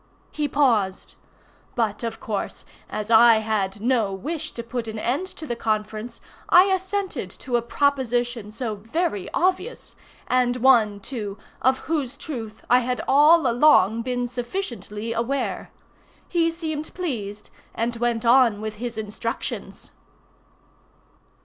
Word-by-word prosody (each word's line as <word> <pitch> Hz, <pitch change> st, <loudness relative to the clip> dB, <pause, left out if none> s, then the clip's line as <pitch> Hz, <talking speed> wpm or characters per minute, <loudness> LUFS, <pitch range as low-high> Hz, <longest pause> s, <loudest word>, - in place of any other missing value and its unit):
He 300 Hz, -1 st, -1 dB
paused. 230 Hz, -10 st, +1 dB, 0.6 s
But, 220 Hz, -3 st, 0 dB
of 225 Hz, -1 st, -4 dB
course, 210 Hz, -3 st, -4 dB, 0.2 s
as 215 Hz, +1 st, -4 dB
I 230 Hz, +1 st, +8 dB
had 210 Hz, -2 st, -1 dB
no 230 Hz, -4 st, +2 dB
wish 305 Hz, -, -4 dB
to 235 Hz, -, -5 dB
put 235 Hz, 0 st, -4 dB
an 220 Hz, 0 st, -5 dB
end 265 Hz, +12 st, -1 dB
to 325 Hz, -, -7 dB
the 240 Hz, -, -3 dB
conference, 215 Hz, 0 st, -3 dB, 0.3 s
I 360 Hz, -, +8 dB
assented 375 Hz, -, -2 dB
to 245 Hz, +6 st, -3 dB
a 240 Hz, -, +3 dB
proposition 245 Hz, -4 st, 0 dB
so 225 Hz, 0 st, -3 dB
very 225 Hz, -, -2 dB
obvious, 370 Hz, +6 st, -1 dB, 0.3 s
and 250 Hz, -1 st, +2 dB
one, 225 Hz, -5 st, +4 dB
too, 210 Hz, -3 st, -5 dB, 0.2 s
of 260 Hz, +1 st, +2 dB
whose 285 Hz, -5 st, -2 dB
truth 225 Hz, -9 st, -7 dB
I 250 Hz, -, +6 dB
had 250 Hz, 0 st, -2 dB
all 300 Hz, +3 st, +6 dB
along 235 Hz, -4 st, +4 dB
been 245 Hz, 0 st, -2 dB
sufficiently 235 Hz, -, -4 dB
aware. 235 Hz, +4 st, -2 dB, 0.6 s
He 335 Hz, -2 st, +2 dB
seemed 315 Hz, -2 st, -5 dB
pleased, 215 Hz, -, -4 dB, 0.2 s
and 235 Hz, +1 st, -1 dB
went 235 Hz, -1 st, 0 dB
on 235 Hz, -3 st, +5 dB
with 215 Hz, 0 st, -5 dB
his 235 Hz, 0 st, -5 dB
instructions. 220 Hz, +2 st, -5 dB
240 Hz, 130 wpm, -24 LUFS, 220-280 Hz, 0.6 s, I